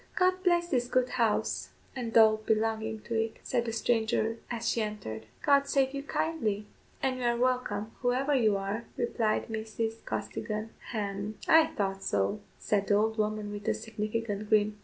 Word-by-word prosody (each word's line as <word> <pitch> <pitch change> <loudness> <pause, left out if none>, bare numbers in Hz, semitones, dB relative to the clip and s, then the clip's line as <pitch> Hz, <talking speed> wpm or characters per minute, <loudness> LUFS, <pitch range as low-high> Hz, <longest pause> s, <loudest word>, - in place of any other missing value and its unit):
"God 370 0 +2
bless 345 -2 +3
this 245 -6 +1
good 255 0 +2
house 230 -4 0 0.3
and 235 -3 0
all 220 -1 +7
belonging 220 0 0
to 235 - -6
it," 225 0 0
said 240 -2 0
the 230 - -2
stranger 225 0 +1
as 235 -1 -3
she 230 - +1
entered. 195 - -5 0.2
"God 280 -1 +4
save 270 -1 +2
you 280 - -3
kindly, 230 -9 -1 0.4
and 260 -1 +1
you - - -3
are 235 0 +2
welcome, 240 -4 0
whoever 260 +3 +1
you 220 -6 +3
are," 200 +4 -3
replied 235 -2 0
Mrs. 225 0 -3
Costigan. 215 +1 -4 0.2
"Hem, 205 -1 -3
I 320 0 +7
thought 195 -5 -2
so," 100 - 0 0.2
said 200 -1 0
the 205 - +4
old 220 +2 +1
woman 215 -1 -1
with 205 0 -7
a - - +2
significant 215 -1 -3
grin. 210 -1 +3
225 Hz, 170 wpm, -30 LUFS, 210-245 Hz, 0.4 s, all